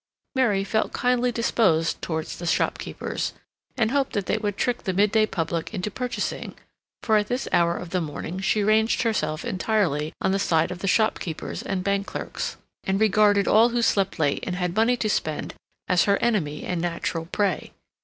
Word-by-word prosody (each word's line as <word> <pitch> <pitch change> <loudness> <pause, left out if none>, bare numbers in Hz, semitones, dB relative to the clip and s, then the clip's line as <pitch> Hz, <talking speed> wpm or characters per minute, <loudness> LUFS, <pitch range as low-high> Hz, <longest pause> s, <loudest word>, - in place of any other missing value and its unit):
Mary 225 -8 +2
felt 220 +2 -1
kindly 250 0 +1
disposed 195 -8 +1
towards 160 -2 -4
the 175 - -4
shopkeepers, - - -1 0.4
and 220 -2 +2
hoped 275 -1 0
that 200 -2 -1
they 215 - 0
would 205 -2 -2
trick 245 -1 0
the 190 - -2
midday 210 +3 +3
public 165 -3 -2
into 195 +2 -3
purchasing, 250 +3 -3 0.5
for 220 -2 +4
at 210 0 +1
this 250 +3 -2
hour 170 0 +3
of 180 -2 -7
the 185 - 0
morning 165 +3 -5
she 205 +2 +1
ranged 220 +3 +3
herself 155 -9 -1
entirely 185 -8 0
on - - +1
the 195 - +1
side 165 -3 +2
of 180 - -6
the 195 - -3
shopkeepers 185 -5 0
and 190 -2 -3
bank 200 +1 0
clerks, - - -4 0.3
and 190 +1 0
regarded 205 -1 +4
all 225 +3 +6
who 240 0 0
slept 195 -3 +1
late 145 -3 0
and 180 - -2
had 180 -1 -2
money 230 +3 +3
to 220 - -1
spend 155 -7 -2 0.3
as 180 -2 +3
her 200 -1 +3
enemy 180 -11 0
and 180 -2 -2
natural 170 -1 -2
prey. 195 -2 -1
200 Hz, 185 wpm, -25 LUFS, 175-220 Hz, 0.5 s, all